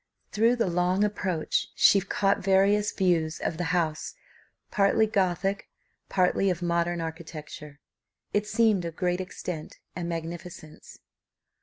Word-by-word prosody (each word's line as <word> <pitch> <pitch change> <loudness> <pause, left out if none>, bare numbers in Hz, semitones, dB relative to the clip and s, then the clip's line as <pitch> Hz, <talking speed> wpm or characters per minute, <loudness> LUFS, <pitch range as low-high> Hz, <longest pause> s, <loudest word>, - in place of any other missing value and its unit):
Through 230 +3 +3
the 235 - +1
long 180 +2 +1
approach, 190 -6 -1
she 200 - +5
caught 195 +1 +1
various 200 +2 +3
views 165 -4 +1
of 160 - -3
the 175 - -2
house, 165 -3 -1 0.6
partly 205 +2 +3
gothic, 195 -1 -1 0.4
partly 190 +1 +2
of 180 -1 -2
modern 170 0 0
architecture; 155 -3 -8 0.5
it 205 0 +1
seemed 215 -4 +2
of 165 -1 -5
great 180 0 0
extent 180 -3 -7 0.2
and 175 -1 -4
magnificence. 165 -1 -7
180 Hz, 125 wpm, -27 LUFS, 170-195 Hz, 0.6 s, she